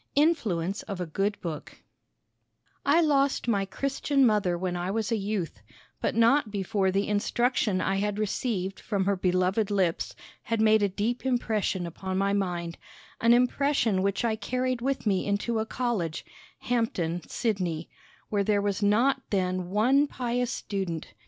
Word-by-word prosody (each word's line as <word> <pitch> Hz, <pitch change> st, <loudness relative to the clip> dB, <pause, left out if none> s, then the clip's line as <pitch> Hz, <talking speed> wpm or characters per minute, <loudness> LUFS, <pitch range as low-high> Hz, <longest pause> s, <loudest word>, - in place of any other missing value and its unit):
INFLUENCE 210 Hz, -, +1 dB
OF 195 Hz, -2 st, -6 dB
A 180 Hz, -, -2 dB
GOOD 195 Hz, +6 st, -1 dB
BOOK 160 Hz, -5 st, -7 dB, 1.0 s
I 295 Hz, +5 st, +4 dB
lost 280 Hz, -5 st, +2 dB
my 200 Hz, -4 st, +1 dB
Christian 275 Hz, +5 st, +1 dB
mother 205 Hz, -6 st, +2 dB
when 180 Hz, 0 st, -2 dB
I 175 Hz, +1 st, -2 dB
was 220 Hz, +2 st, -1 dB
a -, -, +3 dB
youth, 195 Hz, -, -3 dB, 0.4 s
but -, -, 0 dB
not 230 Hz, +2 st, +4 dB
before 200 Hz, -1 st, 0 dB
the 195 Hz, +2 st, 0 dB
instruction 210 Hz, -1 st, +1 dB
I 195 Hz, +1 st, 0 dB
had 205 Hz, +1 st, -1 dB
received 200 Hz, -2 st, -2 dB
from 200 Hz, -3 st, -1 dB
her 200 Hz, 0 st, +2 dB
beloved 185 Hz, +3 st, +1 dB
lips 190 Hz, -5 st, 0 dB, 0.3 s
had 230 Hz, -1 st, -2 dB
made 220 Hz, 0 st, +5 dB
a 200 Hz, -, +2 dB
deep 215 Hz, +6 st, -2 dB
impression 220 Hz, -7 st, 0 dB
upon 185 Hz, +3 st, -4 dB
my 200 Hz, +1 st, +1 dB
mind, 175 Hz, -4 st, -2 dB, 0.4 s
an 230 Hz, -, +4 dB
impression 250 Hz, -5 st, +2 dB
which 200 Hz, +3 st, 0 dB
I 225 Hz, -2 st, +1 dB
carried 250 Hz, +3 st, -2 dB
with 270 Hz, 0 st, -1 dB
me 195 Hz, -2 st, +1 dB
into 210 Hz, +3 st, 0 dB
a 220 Hz, -, -2 dB
college 215 Hz, -12 st, -2 dB, 0.4 s
(Hampden, 185 Hz, -9 st, -1 dB
Sidney), 180 Hz, -8 st, -2 dB, 0.4 s
where 205 Hz, -1 st, +1 dB
there 205 Hz, 0 st, +2 dB
was 200 Hz, 0 st, -1 dB
not 240 Hz, +7 st, +3 dB
then 185 Hz, -2 st, -1 dB
one 255 Hz, +9 st, +3 dB
pious 245 Hz, -2 st, -2 dB
student. 175 Hz, -, -4 dB
205 Hz, 155 wpm, -27 LUFS, 185-235 Hz, 1.0 s, made